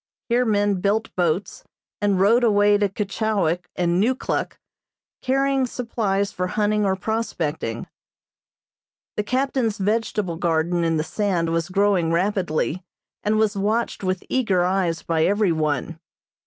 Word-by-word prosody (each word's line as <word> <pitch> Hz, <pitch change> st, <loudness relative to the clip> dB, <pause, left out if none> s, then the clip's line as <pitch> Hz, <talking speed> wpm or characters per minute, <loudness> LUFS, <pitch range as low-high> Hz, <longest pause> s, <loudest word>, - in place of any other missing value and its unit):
Here 245 Hz, +1 st, +3 dB
men 205 Hz, -3 st, +1 dB
built 215 Hz, +3 st, 0 dB
boats, 180 Hz, +2 st, -1 dB, 0.4 s
and 200 Hz, -2 st, +2 dB
rowed 225 Hz, +6 st, +4 dB
away 205 Hz, -2 st, +4 dB
to 205 Hz, -1 st, +2 dB
Keechawik 195 Hz, -4 st, -1 dB
and 175 Hz, +1 st, +1 dB
Neukluk, 255 Hz, +4 st, -1 dB, 0.6 s
carrying 270 Hz, 0 st, +1 dB
supplies 210 Hz, -5 st, -1 dB
for 180 Hz, 0 st, -2 dB
hunting 210 Hz, +1 st, +1 dB
or 190 Hz, -, +1 dB
prospecting. 175 Hz, -, -3 dB, 1.3 s
The -, -, 0 dB
captain's 255 Hz, -1 st, 0 dB
vegetable 210 Hz, -3 st, -1 dB
garden 170 Hz, +1 st, 0 dB
in 165 Hz, -1 st, +1 dB
the 155 Hz, -, 0 dB
sand 175 Hz, -2 st, -1 dB
was 165 Hz, 0 st, -1 dB
growing 190 Hz, -3 st, +2 dB
rapidly, 180 Hz, -1 st, 0 dB, 0.4 s
and 215 Hz, +1 st, +1 dB
was 215 Hz, -1 st, +2 dB
watched 210 Hz, +3 st, -1 dB
with 185 Hz, -1 st, -1 dB
eager 200 Hz, -9 st, +1 dB
eyes 180 Hz, -3 st, 0 dB
by 160 Hz, -1 st, +1 dB
everyone. 165 Hz, -6 st, 0 dB
200 Hz, 130 wpm, -23 LUFS, 175-215 Hz, 1.3 s, rowed